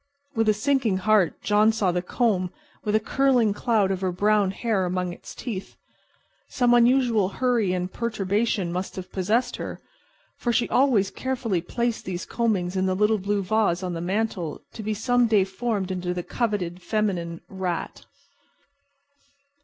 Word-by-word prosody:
With 225 -3 +2
a - - +5
sinking 230 -3 +1
heart 200 -3 +2
John 210 +1 +4
saw 210 -5 +1
the 180 0 -1
comb 185 -2 0 0.3
with 210 -1 0
a - - +5
curling 245 -2 +2
cloud 210 -3 +1
of 190 -1 -2
her 185 -1 0
brown 205 +2 +2
hair 205 0 0
among 180 0 -1
its - - -11
teeth. 205 -6 -6 0.7
Some 245 -2 +2
unusual 240 -4 +4
hurry 235 -3 +1
and 180 0 -3
perturbation 210 -4 -1
must 185 +1 -4
have 185 -1 -7
possessed 210 +6 0
her, - - -6 0.6
for 240 - -1
she 235 +1 +1
always 240 -8 +3
carefully 240 -8 -2
placed 235 +6 -2
these 180 -1 -4
combings 200 -6 -1
in 190 0 +1
the 185 - +1
little 210 +2 +2
blue 200 +1 -1
vase 195 -3 +1
on 180 -1 -2
the 165 - -4
mantel 185 -4 -2
to 225 - -7
be 215 0 -2
some 245 +2 +2
day 210 -3 +4
formed 195 0 -2
into 180 -1 -2
the 175 - -3
coveted 190 -7 -2
feminine 175 -5 -1
"rat." 185 -3 -4
205 Hz, 160 wpm, -25 LUFS, 185-230 Hz, 0.7 s, a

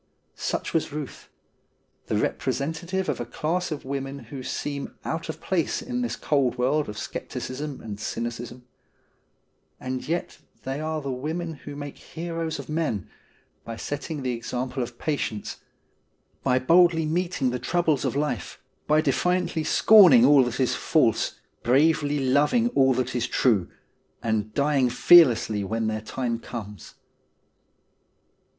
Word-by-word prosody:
Such - - -3
was 165 - +1
Euth; 145 -2 -7 0.8
the - - 0
representative 170 +6 -2
of - - -1
a - - -1
class 170 +8 -2
of 150 - -5
women 135 0 -4 0.2
who 135 - -5
seem 140 +2 -4
out 165 0 -3
of 160 - -5
place 175 -5 -1
in 250 -1 -3
this 245 - -2
cold 135 -4 +1
world 140 +3 +1
of 105 - -7
scepticism 135 +6 -5
and 105 -2 -7
cynicism. 120 +2 -5 1.1
And 130 0 -4
yet 170 +3 -3 0.2
they 135 +2 -3
are 155 -1 -3
the 140 - -3
women 160 +6 -3
who 145 -1 -9
make 145 -1 -7
heroes 165 -1 -4
of - - -8
men, 155 - -2 0.5
by 115 - -6
setting 145 +3 -5
the 130 - 0
example 125 +3 -3
of 120 0 -5
patience, 140 -8 -3 0.8
by 130 -1 +2
boldly 165 +4 +4
meeting 165 -5 0
the 125 - -3
troubles 165 -2 +1
of - - -1
life, 145 - -2 0.3
by 155 +1 +4
defiantly 175 +3 0
scorning 175 - +7
all 140 -1 +7
that 120 +1 -4
is 130 - +2
false - - +1 0.2
bravely 145 +3 +3
loving 145 - +2
all 135 - +3
that 125 0 -2
is 120 - 0
true, 105 -9 +2 0.5
and 110 -1 -1
dying 140 -3 +2
fearlessly 120 -10 +5
when 110 +3 -2
their 110 0 -1
time 115 +1 -3
comes. 105 -4 -8
140 Hz, 140 wpm, -25 LUFS, 125-160 Hz, 1.1 s, scorning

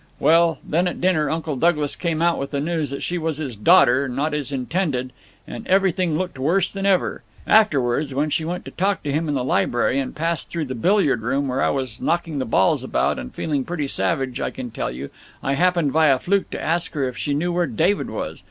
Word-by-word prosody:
Well, 165 0 +4
then, 175 +3 +1
at 180 - -4
dinner, 165 -5 +2
Uncle 160 -1 -2
Douglas 150 0 +1
came 165 -2 -1
out 170 -1 +2
with 140 - -3
the 140 - -2
news 155 -1 -1
that 140 - -5
she 175 0 -2
was 160 -2 -2
his 140 -7 -5
daughter, 125 +6 +4
not 145 +5 -1
his 145 -2 -3
intended, 130 -1 -2 0.3
and - - -8
everything 185 -4 +2
looked 180 -5 -4
worse 170 +7 +2
than 195 0 -2
ever. 190 -2 +1 0.2
Afterwards 145 - +3
when 145 +3 -1
she 160 - 0
went 175 +3 -4
to - - -8
talk 195 +2 -1
to 145 - -2
him 155 +2 -1
in 145 - 0
the 130 - -1
library, 125 +1 +1
and 135 - -4
passed 165 -1 -2
through 165 -3 -3
the 130 - -5
billiard 170 - +2
room 135 +5 -1
where 130 +1 -1
I - - +3
was 130 -5 -3
knocking 165 -3 -1
the 130 - -1
balls 95 -4 +2
about - - 0
and 60 - -7
feeling 145 -4 -2
pretty 155 -1 -3
savage, 135 -3 -1
I - - -1
can 125 -3 -7
tell - - -3
you, 65 +3 -7 0.3
I 135 - 0
happened, 170 -2 +2
by 160 0 +4
a 135 -2 +5
fluke, 195 +8 0
to - - -5
ask 170 +2 -1
her 140 -4 0
if 125 - -6
she 145 -1 -2
knew 175 +4 -1
where 175 -1 +1
David 175 - 0
was. - - -5
150 Hz, 230 wpm, -22 LUFS, 135-175 Hz, 0.3 s, a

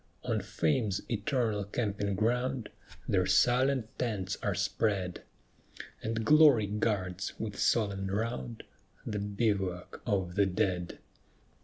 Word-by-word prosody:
On 115 -4 0
Fame's 110 0 0
eternal 110 -1 0
camping 100 -1 -2
ground 125 +3 0 0.4
Their 90 -2 +2
silent 125 +5 +3
tents 105 -7 -1
are - - 0
spread, 95 -5 -1 0.8
And 110 0 -2
Glory 150 -7 +7
guards, 100 -3 -1
with 105 -3 -4
solemn 100 -4 +1
round, 115 +3 -3 0.4
The 105 - -2
bivouac 100 -3 -1
of 95 -5 0
the 100 +1 +3
dead. 90 -1 -1
105 Hz, 110 wpm, -31 LUFS, 95-115 Hz, 0.8 s, Glory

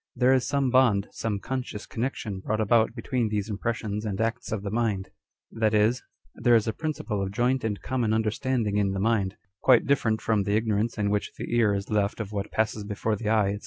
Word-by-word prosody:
There 125 +1 +4
is 130 -1 +2
some 140 -2 +1
bond, 120 -6 +3
some 110 -3 -2
conscious 125 -1 -5
connection 110 -5 -3
brought 110 +3 -2
about 110 +2 +3
between 120 -1 -1
these 105 0 -2
impressions 105 0 -2
and 105 -2 -3
acts 115 0 -2
of 105 -2 -2
the 100 - -3
mind; 110 -4 -1 0.4
that 110 -1 +1
is, 110 +4 +3 0.3
there 120 -1 +3
is 110 -1 +3
a 110 - 0
principle 120 -10 -3
of 95 - -2
joint 125 +4 +1
and 105 -2 -2
common 125 -4 0
understanding 110 0 0
in 100 -2 +1
the 95 - -2
mind, 105 -2 +1 0.2
quite 125 -3 +5
different 115 -6 +2
from 110 -2 +1
the 100 +1 0
ignorance 110 +1 0
in 100 -1 0
which 105 0 -1
the - - -3
ear 110 -4 +3
is 100 +1 -4
left 105 0 0
of 105 -2 -4
what 100 -2 -3
passes 110 -1 0
before 105 +1 -2
the 105 +1 -3
eye, 105 -3 +3
&c. - - -10
110 Hz, 215 wpm, -26 LUFS, 105-120 Hz, 0.4 s, quite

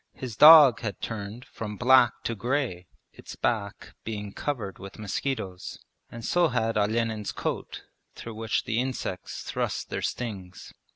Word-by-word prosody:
His 125 -5 -7
dog 150 -3 +9
had 105 -4 -5
turned 110 +2 -6
from 105 -2 -7
black 125 -1 +4
to 115 - -2
grey, 120 -6 -2 0.3
its - - -11
back 105 -4 -3
being 105 -2 -5
covered 115 -10 -4
with 100 0 -10
mosquitoes, 105 -3 -4 0.3
and 115 -1 -8
so 175 -1 +3
had 115 -4 -1
Olenin's 110 0 0
coat - - -4 0.3
through 115 - -8
which 110 0 -1
the 110 - -1
insects 125 -7 -4
thrust - - -3
their - - -2
stings. 95 -7 -5
115 Hz, 140 wpm, -27 LUFS, 105-125 Hz, 0.3 s, dog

